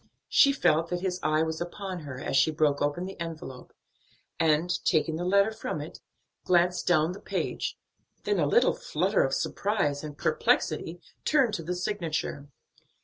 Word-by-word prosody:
She 280 - +6
felt 165 - +2
that 180 0 -2
his 185 -1 -2
eye 155 +1 +2
was 160 +1 -3
upon 185 +1 -5
her 140 -5 -8
as - - -3
she 140 - +5
broke 150 -2 +1
open 145 +5 -1
the 190 -1 -8
envelope 160 -6 -7 0.7
and, 160 +2 +2
taking 160 -1 +2
the 170 - -3
letter 200 +3 +3
from 220 - -4
it, - - -8 0.4
glanced 180 0 +2
down 160 -1 +3
the 185 - -8
page, - - -3 0.5
then 415 - 0
in - - +1
a - - +2
little 475 - +4
flutter - - 0
of - - 0
surprise 195 -9 -1
and 150 -1 -7
perplexity 170 +4 0 0.2
turned 270 -8 +3
to 180 - -2
the 180 +3 -3
signature. 170 -6 -3
170 Hz, 170 wpm, -28 LUFS, 155-190 Hz, 0.7 s, She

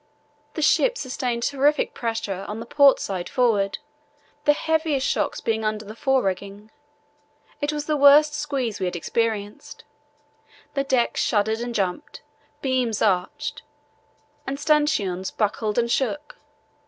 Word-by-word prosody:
The 315 - -2
ship - - +3
sustained 250 - -3
terrific 285 +3 +1
pressure 220 -5 -3
on 210 +1 -5
the 230 - -6
port 280 +2 +5
side 185 -3 -4
forward, 215 -6 +1 0.7
the 295 - +6
heaviest 315 -3 0
shocks - - -1
being 220 -1 -1
under 215 0 -2
the 210 - -8
forerigging. 205 -5 -1 0.9
It 290 +1 0
was 295 -1 -4
the 305 - 0
worst 295 +1 +6
squeeze 275 -7 -2
we 185 - -1
had 180 - -4
experienced. 210 +3 -3 0.9
The 275 -1 0
decks 255 -3 +1
shuddered 220 +1 +1
and 240 0 -4
jumped, 195 +9 -3 0.4
beams 255 -5 0
arched, 185 -4 -1 0.9
and 275 +1 -3
stanchions 225 - +1
buckled 210 0 -1
and 235 0 +1
shook. 295 +4 -2
235 Hz, 130 wpm, -23 LUFS, 210-285 Hz, 0.9 s, the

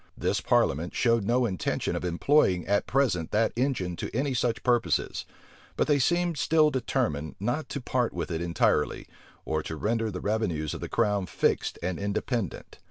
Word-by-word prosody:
This - - 0
parliament 80 +6 +1
showed 115 -4 +2
no 120 +3 +2
intention 95 -7 -1
of - - -3
employing 90 - +2
at 100 +1 +1
present 120 - +1
that 110 +1 +1
engine 120 -9 -1
to - - -4
any 135 +2 0
such 120 -2 0
purposes; 120 -2 +1 0.5
but - - +3
they 145 -2 +3
seemed 175 +3 +1
still 155 -1 +4
determined 115 - -1
not 120 +10 -2
to 140 - -3
part 125 -1 0
with 85 0 -4
it 80 0 -2
entirely, 85 -3 +1 0.4
or 80 0 -1
to 80 - -5
render 115 +6 0
the 90 -3 -5
revenues 90 -9 -1
of - - -7
the - - -5
crown 100 -3 +1
fixed - - 0
and 90 0 -2
independent. 100 - -3
110 Hz, 170 wpm, -27 LUFS, 90-125 Hz, 0.5 s, still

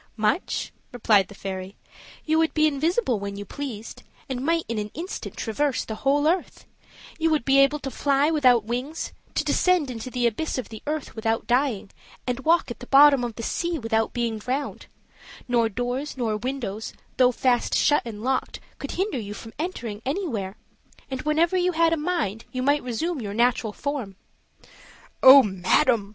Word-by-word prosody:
"Much," 215 - 0 0.2
replied 215 -6 +3
the 205 - -13
fairy, 190 0 -6 0.5
"you 315 +1 +2
would 325 0 +1
be 310 -1 +4
invisible 305 - +1
when 200 0 -5
you 205 0 -6
pleased, 230 -2 -7 0.3
and 255 -2 -3
might 330 +2 +1
in 230 -1 -2
an 210 0 -4
instant 350 +5 -6
traverse 270 +3 -1
the 220 - -5
whole 290 +2 +2
earth; 350 +2 -1 0.5
you 325 0 +2
would 305 -6 +1
be 275 0 +5
able 275 +2 +4
to 275 -2 -6
fly 285 +3 +2
without 255 -7 +4
wings, 250 +8 -4 0.2
to - - +1
descend 360 -7 +2
into 230 +1 -6
the 250 -1 -1
abyss 235 +8 -1
of 255 - -4
the 220 -1 -9
earth 305 -1 -3
without 225 0 -1
dying, 245 -5 0 0.3
and 250 0 -2
walk 325 -1 +2
at - - -7
the 250 - -10
bottom 275 -2 +7
of 235 -2 -4
the 230 - -6
sea 340 +7 -1
without 225 -3 0
being 235 -3 -2
drowned; 260 +6 -4 0.6
nor 235 -2 +2
doors, 245 +6 -3
nor 225 -4 0
windows, 225 -2 -4 0.2
though 255 -1 +5
fast 245 0 +1
shut 295 - +3
and 220 -3 -7
locked, 260 +1 -1 0.2
could - - -5
hinder 380 - -1
you 205 -1 -6
from 225 0 -10
entering 240 - -4
anywhere; 255 - -3 0.6
and 260 -1 -3
whenever 320 +4 +2
you 365 0 +2
had 330 0 +3
a - - +3
mind, 300 - -2
you 255 0 -3
might 285 +2 +3
resume 270 +6 -3
your 205 -2 -5
natural 235 -2 +2
form." 255 -6 -4 1.1
"Oh, 265 +1 +10
madam!" 200 +3 +2
255 Hz, 180 wpm, -25 LUFS, 225-300 Hz, 1.1 s, Oh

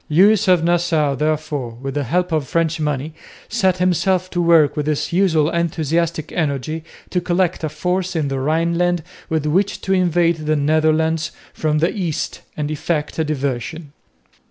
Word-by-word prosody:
Lewis 200 +6 +4
of 180 -3 +4
Nassau 170 -4 +2
therefore, 145 -4 -2
with 135 +1 -5
the 145 0 -1
help 180 +7 0
of 155 -4 0
French 165 +1 0
money, 150 0 -2 0.4
set 190 -5 +1
himself 185 0 +1
to 175 - 0
work 165 -3 +4
with 150 -1 -2
his 155 +2 -1
usual 165 -5 +3
enthusiastic 165 -1 -1
energy 155 0 -2 0.3
to 180 - 0
collect 175 -1 0
a 155 - 0
force 180 +4 -2
in 155 -3 0
the 135 -1 -2
Rhineland 170 +4 +1 0.3
with 160 -2 0
which 185 +7 +1
to 190 - 0
invade 175 -2 +2
the 155 - +3
Netherlands 155 +2 +1 0.2
from 155 -1 0
the 165 +3 +1
east 165 -7 -3 0.2
and 150 0 -2
effect 155 0 -2
a - - +3
diversion. 140 +1 -3
160 Hz, 160 wpm, -20 LUFS, 150-175 Hz, 0.4 s, Lewis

